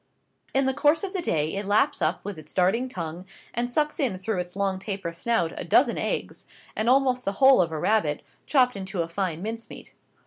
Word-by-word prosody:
In 270 0 +4
the 265 - +1
course 295 +5 +3
of 390 0 -4
the 375 - -1
day 155 - 0
it 200 +1 -2
laps 205 +1 +2
up 170 +4 0
with 200 -5 -5
its 155 -1 -11
darting 200 +8 +2
tongue, 170 -4 -6 0.3
and 240 +1 -1
sucks 300 +4 0
in 245 -10 0
through 190 +1 -2
its 180 0 -5
long 195 -1 -1
taper 195 -4 -4
snout 170 -2 0
a - - -4
dozen - - +3
eggs, - - -3 0.3
and 220 +2 0
almost 255 -1 +3
the 195 - -1
whole 265 +1 +6
of 170 -2 -1
a 160 - -3
rabbit, 155 -4 +1 0.2
chopped 250 -5 +3
into 190 -2 -3
a - - -6
fine 175 -1 -3
mince 225 +1 -5
meat. - - -11
200 Hz, 215 wpm, -26 LUFS, 180-250 Hz, 0.3 s, whole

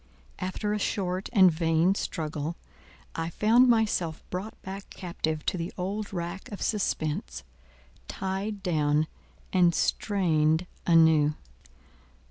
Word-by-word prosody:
After 205 +3 -2
a 210 - -1
short 185 -2 -2
and 190 -5 +6
vain 165 +2 +2
struggle, 155 -4 -3 0.6
I 165 0 -3
found 225 +8 +4
myself 210 -8 +1
brought 195 +5 -5
back 195 +1 -7
captive 160 -4 -3
to 185 - -1
the 165 - -3
old 200 +3 -3
rack 175 +2 -5
of 205 - -6
suspense, 155 -7 -2 0.6
tied 195 +2 -4
down 150 -3 +2 0.5
and 175 -3 +4
strained 165 -5 +1 0.2
anew. 160 -3 +5
180 Hz, 110 wpm, -28 LUFS, 160-200 Hz, 0.6 s, and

